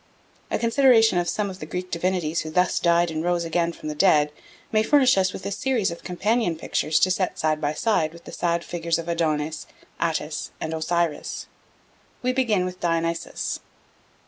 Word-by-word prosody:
A - - 0
consideration 230 -4 +4
of 175 - -1
some 205 -2 -1
of 185 - -10
the 155 - -7
Greek 180 +2 -5
divinities 170 -2 0
who 155 - -6
thus 180 +2 +2
died 170 0 +3
and 160 0 -3
rose 175 -1 0
again 170 +1 0
from 155 - -9
the 155 - -2
dead 150 -3 +4 0.4
may 215 - +3
furnish 260 +2 +4
us 185 -1 +2
with 190 - -8
a 200 - -2
series 230 -3 0
of 170 - -9
companion 195 +1 0
pictures 155 -1 0
to 185 - +4
set 185 0 -1
side 155 0 0
by 145 0 0
side 160 -3 +1
with 170 0 -14
the - - -10
sad 170 0 -1
figures 170 -1 -1
of 165 0 -6
Adonis, 155 -2 -1 0.3
Attis, 160 -2 -2
and 160 - -3
Osiris. 165 0 -1 0.8
We 255 0 +1
begin 225 -8 +1
with 185 0 -6
Dionysus. 165 -1 -1
170 Hz, 185 wpm, -24 LUFS, 160-190 Hz, 0.8 s, consideration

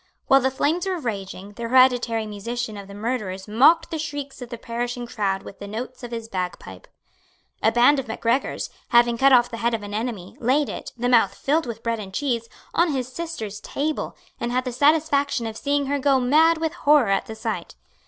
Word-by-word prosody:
While 270 0 +5
the 265 - +2
flames 305 +7 0
were 375 -1 0
raging, 200 - -5
the 230 +3 -5
hereditary 245 -3 +4
musician 220 +2 -4
of 200 -1 -9
the 200 - -10
murderers 205 -4 -3
mocked 310 +11 +4
the 320 - -3
shrieks 290 -3 -5
of 245 - -7
the 235 - -6
perishing 240 +1 -4
crowd 195 -4 -2
with - - -11
the 200 - -7
notes 235 +5 -6
of 245 - -7
his 230 -1 -5
bagpipe. 180 - -5 0.7
A 220 - +4
band 245 +5 +5
of 265 - -5
Macgregors, 230 +4 -1 0.2
having 240 -1 +4
cut 270 +3 +4
off 245 -2 +5
the 230 - -5
head 235 0 +1
of 215 - -6
an 205 0 -7
enemy, 215 -4 -4
laid 265 +4 +2
it, - - -6
the 245 +1 -1
mouth 225 -6 +4
filled 310 +2 0
with 230 -1 -6
bread 230 -1 -1
and 195 -2 -7
cheese, 235 -5 -1 0.2
on 340 -2 +2
his 255 -2 -2
sister's 240 -12 -5
table, 305 +2 -3 0.2
and 240 - -2
had 255 +1 0
the 250 - -2
satisfaction 285 -2 +2
of 220 -1 -4
seeing 285 +3 0
her 285 +1 -1
go 275 -1 +3
mad 310 +6 +4
with 320 0 -2
horror 295 -8 +4
at 195 - +1
the 220 - -6
sight. 220 -6 -4
240 Hz, 210 wpm, -23 LUFS, 220-280 Hz, 0.7 s, While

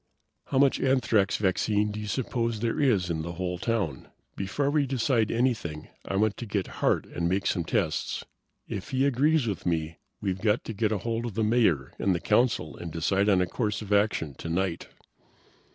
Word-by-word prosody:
"How 135 - -2
much 135 0 +4
anthrax 115 -7 +2
vaccine 105 +2 +1
do 105 - -5
you 105 - -5
suppose 115 -1 -1
there 115 -1 0
is 105 - +2
in 80 -1 -1
the 85 +2 -5
whole 90 0 -3
town? 100 - -2 0.3
Before 135 +9 -1
we 145 -2 +2
decide 120 -4 +1
anything 115 -11 -1 0.2
I - - -2
want 105 +1 +2
to 120 - -6
get 100 -2 -1 0.2
Hart - - +2
and 85 0 -2
make 95 +2 0
some 90 - +1
tests. - - -1 0.4
If 95 - -5
he 135 0 +1
agrees 140 +2 +3
with 105 -4 -3
me 80 -2 -1 0.2
we've 95 -2 -2
got 110 0 +2
to 115 - -5
get 110 +1 +1
hold 115 +3 -2
of 110 - -7
the 110 - +1
Mayor 105 - +2
and 95 -2 +2
the - - -1
Council 120 -7 +1
and 85 - -7
decide 95 +5 +1
on 95 -3 +4
a - - +3
course 105 +2 -2
of 105 0 -2
action 100 -8 +1
tonight." 85 +4 -2
105 Hz, 190 wpm, -27 LUFS, 90-120 Hz, 0.4 s, much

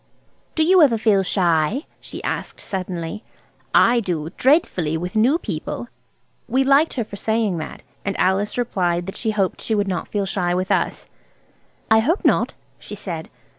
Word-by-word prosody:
"Do 315 - +3
you 365 +2 +5
ever 260 -7 +5
feel 215 -3 +3
shy," 180 - +1 0.2
she - - -9
asked - - -4
suddenly. 185 +1 -4 0.5
"I 240 +1 +5
do, 170 -7 -3
dreadfully, 185 - +2
with 180 +4 -5
new 245 +9 +4
people." 210 - -5 0.6
We 265 +2 +2
liked 275 +4 +4
her 240 - 0
for 205 -1 -9
saying 220 -5 0
that, 155 - -7 0.2
and 200 - -2
Alice 195 +4 +1
replied 175 -7 0
that 195 - -6
she 225 - -2
hoped 200 -4 0
she 220 - 0
would 205 -1 +1
not 180 -3 -2
feel 205 -2 -1
shy 180 -2 -1
with 185 +1 -1
us. - - 0 0.9
"I 220 - +7
hope 315 - 0
not," - - +2 0.2
she 210 - -8
said. 175 -6 -6
200 Hz, 170 wpm, -21 LUFS, 180-235 Hz, 0.9 s, I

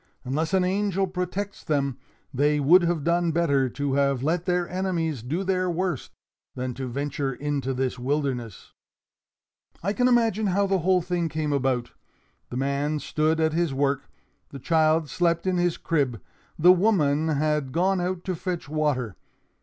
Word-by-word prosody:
"Unless 155 +8 -1
an 185 - +3
angel 195 +1 0
protects 185 +2 -4
them, 140 -4 -1 0.3
they 145 +3 +2
would 165 +7 +6
have 170 -3 0
done 170 +1 +2
better 140 -5 +2
to 140 +2 -2
have 140 -2 +1
let 165 +4 0
their 180 -1 0
enemies 170 -7 -2
do 155 - -2
their 185 -1 0
worst, 175 -4 -2 0.5
than 125 0 -3
to 130 +1 -5
venture 140 +1 -3
into 140 -1 -2
this 130 -1 -2
wilderness. 130 -5 -3 1.1
"I 200 +3 0
can 250 +3 +2
imagine 225 -4 +2
how 200 +2 +2
the 195 -1 +1
whole 180 +1 +2
thing 175 -2 -1
came 155 -2 -2
about. 130 -3 0 0.6
The 125 - -5
man 140 +3 0
stood 155 +2 0
at 160 -1 +2
his 165 -4 0
work; 140 0 0 0.4
the 140 - -8
child 155 +2 +2
slept 170 +2 0
in 185 -1 +1
his 175 -1 +1
crib; 140 -9 -1 0.4
the 180 +3 +7
woman 160 -6 +2
had 150 -2 0
gone 185 +4 +1
out 180 0 -2
to 185 - -2
fetch 175 -2 -4
water. 145 - -1
155 Hz, 160 wpm, -25 LUFS, 140-180 Hz, 1.1 s, the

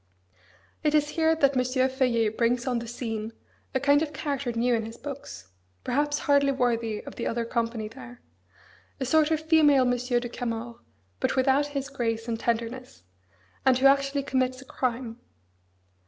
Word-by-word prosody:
It 305 0 +2
is 295 -1 +3
here 320 +1 +2
that 280 -3 +2
M. 255 - +3
Feuillet 255 -3 +1
brings 240 +1 +1
on 250 -3 0
the 235 - -7
scene 225 -2 -4 0.4
a - - +3
kind 285 +2 +4
of 315 -1 -2
character 280 -5 -2
new 240 +1 +1
in 225 -1 +1
his 225 - -10
books; 275 - -8 0.3
perhaps 290 +3 0
hardly 280 -1 +4
worthy 230 -4 0
of - - -10
the - - -2
other 230 0 -1
company 230 -2 -2
there; 245 +1 -12 0.8
a 265 - -1
sort 310 +3 +3
of 315 -1 +1
female 305 -4 +5
Monsieur 245 0 +1
de 240 - -5
Camors, 235 -1 -5 0.4
but - - 0
without 270 +2 +3
his 275 0 -2
grace 230 -4 -2
and 225 -1 -2
tenderness, 235 - -3 0.6
and 260 -1 +4
who 260 - 0
actually 275 0 +4
commits 255 -1 0
a 265 - -12
crime. 245 -2 -3
255 Hz, 170 wpm, -27 LUFS, 235-280 Hz, 0.8 s, female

